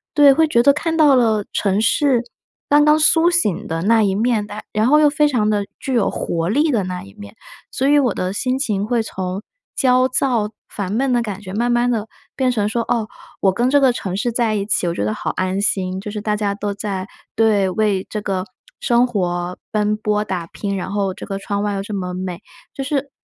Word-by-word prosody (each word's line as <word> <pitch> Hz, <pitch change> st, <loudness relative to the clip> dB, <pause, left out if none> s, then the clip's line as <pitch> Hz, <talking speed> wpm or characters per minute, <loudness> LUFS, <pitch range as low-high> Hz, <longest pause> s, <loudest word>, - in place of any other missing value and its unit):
对， 290 Hz, -2 st, +7 dB
会 320 Hz, +3 st, +3 dB
觉 235 Hz, -6 st, +3 dB
得 280 Hz, -, +6 dB
看 325 Hz, +2 st, -2 dB
到 295 Hz, -4 st, +6 dB
了 220 Hz, -4 st, +2 dB
城 200 Hz, 0 st, +1 dB
市 245 Hz, +2 st, +2 dB, 0.4 s
刚 295 Hz, +1 st, +5 dB
刚 300 Hz, +1 st, +4 dB
苏 325 Hz, +2 st, +5 dB
醒 340 Hz, -, 0 dB
的 165 Hz, +1 st, -3 dB
那 225 Hz, +3 st, +4 dB
一 195 Hz, -2 st, +1 dB
面， 220 Hz, 0 st, +1 dB
但 210 Hz, -, -7 dB
然 215 Hz, +3 st, +2 dB
后 300 Hz, +3 st, +5 dB
又 300 Hz, -1 st, +5 dB
非 300 Hz, 0 st, +3 dB
常 240 Hz, -7 st, +1 dB
的 205 Hz, -1 st, 0 dB
具 265 Hz, -, -3 dB
有 235 Hz, -5 st, +2 dB
活 165 Hz, 0 st, -2 dB
力 295 Hz, +8 st, +2 dB
的 220 Hz, -6 st, +1 dB
那 180 Hz, 0 st, -5 dB
一 100 Hz, -, -14 dB
面。 100 Hz, +1 st, -12 dB, 0.3 s
所 270 Hz, -, -1 dB
以 290 Hz, 0 st, +5 dB
我 250 Hz, -7 st, +1 dB
的 185 Hz, +1 st, -2 dB
心 255 Hz, +4 st, -1 dB
情 210 Hz, -7 st, -1 dB
会 235 Hz, +1 st, +1 dB
从 190 Hz, -2 st, -4 dB, 0.3 s
焦 255 Hz, -1 st, +3 dB
躁、 245 Hz, -5 st, 0 dB, 0.2 s
烦 195 Hz, -2 st, -5 dB
闷 260 Hz, +5 st, 0 dB
的 240 Hz, -, +2 dB
感 205 Hz, -3 st, -6 dB
觉 185 Hz, -2 st, -8 dB
慢 240 Hz, +3 st, 0 dB
慢 240 Hz, +1 st, +2 dB
地 225 Hz, -3 st, -1 dB, 0.3 s
变 260 Hz, -2 st, +1 dB
成 210 Hz, -4 st, 0 dB
说， 230 Hz, +2 st, -1 dB
哦， 230 Hz, -2 st, -1 dB, 0.3 s
我 195 Hz, -, +3 dB
跟 240 Hz, +5 st, +1 dB
这 285 Hz, +2 st, +4 dB
个 265 Hz, -2 st, +4 dB
城 190 Hz, -5 st, -4 dB
市 235 Hz, +4 st, -1 dB
在 230 Hz, -2 st, 0 dB
一 200 Hz, -, -1 dB
起， 200 Hz, -, 0 dB
我 170 Hz, -, 0 dB
觉 100 Hz, -, -2 dB
得 105 Hz, -, 0 dB
好 -, -, -3 dB
安 185 Hz, +1 st, -2 dB
心， 190 Hz, -2 st, -1 dB
就 210 Hz, -, -6 dB
是 210 Hz, 0 st, -5 dB
大 210 Hz, 0 st, 0 dB
家 205 Hz, -1 st, -1 dB
都 205 Hz, 0 st, -3 dB
在 195 Hz, -2 st, -4 dB, 0.3 s
对， 215 Hz, -3 st, +3 dB
为 200 Hz, -1 st, 0 dB
这 210 Hz, -, -4 dB
个 190 Hz, -2 st, -2 dB, 0.4 s
生 240 Hz, +1 st, +3 dB
活 180 Hz, -5 st, -2 dB
奔 210 Hz, 0 st, +1 dB
波 210 Hz, -1 st, 0 dB
打 180 Hz, -4 st, -3 dB
拼， 200 Hz, +3 st, -4 dB
然 185 Hz, -, -5 dB
后 200 Hz, -2 st, -1 dB
这 -, -, -8 dB
个 195 Hz, -1 st, -4 dB
窗 200 Hz, +1 st, -3 dB
外 205 Hz, -1 st, -1 dB
又 195 Hz, -, -2 dB
这 210 Hz, -, -7 dB
么 180 Hz, -2 st, -4 dB
美。 185 Hz, -1 st, -5 dB, 0.3 s
就 270 Hz, -, -3 dB
是 280 Hz, 0 st, -2 dB
215 Hz, 250 characters per minute, -19 LUFS, 195-250 Hz, 0.4 s, 对